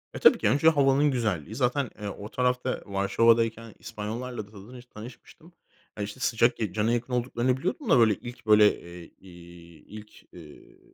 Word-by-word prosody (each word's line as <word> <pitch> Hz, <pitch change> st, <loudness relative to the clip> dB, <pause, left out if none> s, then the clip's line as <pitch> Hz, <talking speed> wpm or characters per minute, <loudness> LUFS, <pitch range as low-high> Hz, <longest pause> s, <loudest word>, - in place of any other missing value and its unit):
Eee, -, -, -5 dB
tabii -, -, +6 dB
ki, -, -, +1 dB
önce 145 Hz, +4 st, +4 dB
havanın 140 Hz, -1 st, +3 dB
güzelliği. 110 Hz, -, -2 dB
Zaten, 130 Hz, +1 st, 0 dB
eee, 105 Hz, -, -5 dB
o 100 Hz, +1 st, -9 dB
tarafta 125 Hz, +1 st, -1 dB
Varşova'dayken 115 Hz, +3 st, +1 dB
İspanyollarla 110 Hz, +1 st, -6 dB
da 105 Hz, -, -21 dB
tanış 120 Hz, +5 st, -13 dB
tanışmıştım. 125 Hz, +9 st, -14 dB, 0.4 s
Ya, 105 Hz, -, -3 dB
işte, 105 Hz, +4 st, -8 dB
sıcak 120 Hz, -1 st, +1 dB
cana 110 Hz, +2 st, 0 dB
yakın 120 Hz, +1 st, -3 dB
olduklarını 125 Hz, +1 st, 0 dB
biliyordum 185 Hz, -, -4 dB
da, 130 Hz, -, +5 dB
böyle, 110 Hz, -2 st, +5 dB
ilk 120 Hz, +4 st, -11 dB
böyle, 105 Hz, -1 st, +5 dB
eee, 85 Hz, -1 st, -12 dB, 0.8 s
ilk, 105 Hz, 0 st, -14 dB
eee, 80 Hz, -4 st, -15 dB
115 Hz, 160 wpm, -26 LUFS, 105-125 Hz, 0.8 s, tabii